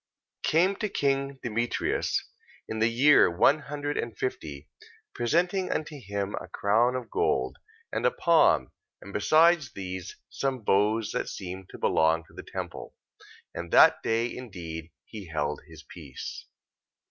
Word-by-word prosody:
Came 180 +5 +3
to 215 - -2
king 140 -5 0
Demetrius 120 0 -1 0.4
in 110 - -4
the 110 - +4
year 135 +3 +5
one 110 - +4
hundred 145 0 -4
and 115 -2 -4
fifty, 75 - -4 0.5
presenting 175 - 0
unto 155 -1 -3
him 100 -1 -3
a - - -9
crown 115 +5 +2
of 125 -3 -5
gold, 65 0 0 0.3
and - - -2
a - - +5
palm, - - +3 0.3
and 100 - -12
besides 155 +6 +4
these, 95 -2 -6
some 130 -4 -3
boughs 105 +2 +2
that - - -2
seemed 95 0 -7
to - - -10
belong 80 +1 +2
to - - -22
the - - -8
temple. - - -7 0.6
And 85 - -6
that - - +7
day 115 +1 0
indeed 85 -9 -7 0.2
he 105 -5 -9
held 75 -2 -2
his 80 -2 -13
peace. 75 -7 -9
110 Hz, 145 wpm, -27 LUFS, 90-140 Hz, 0.6 s, that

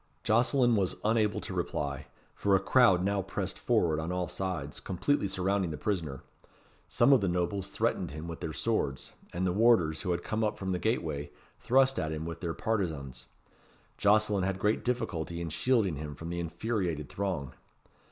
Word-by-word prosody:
Jocelyn 120 +2 +3
was 95 -3 0
unable 110 -1 +2
to - - -6
reply, 70 -1 -3 0.3
for 100 -1 +2
a - - +4
crowd 100 -2 +4
now 100 0 +1
pressed 95 - -4
forward 80 -3 +2
on 80 +3 -3
all 90 -1 -1
sides, 90 -6 -4
completely 100 +5 0
surrounding 95 -1 0
the 75 - -4
prisoner. 80 -10 -2 0.6
Some 140 - +4
of 130 - +5
the 100 - +1
nobles 90 +2 -1
threatened 90 - -1
him 75 +3 -7
with 85 -1 -6
their 80 - -4
swords, 75 - -2 0.2
and 90 +2 -1
the 90 - +2
warders, 95 -8 +4
who - - -3
had 85 0 0
come 110 +1 -1
up 105 - 0
from 95 -1 -3
the 90 - -1
gateway, 80 - -1 0.3
thrust 135 +1 +3
at 80 - -2
him 80 0 -4
with 85 0 -5
their 85 -3 -3
partizans. 70 - -3 0.7
Jocelyn 105 -1 +3
had 95 0 -1
great 105 +2 +1
difficulty 90 -9 -2
in 85 -1 -3
shielding 100 - +1
him 75 0 -6
from 80 +3 -7
the 85 - -3
infuriated 85 -3 -2
throng. 90 -9 -3
90 Hz, 180 wpm, -30 LUFS, 80-105 Hz, 0.7 s, of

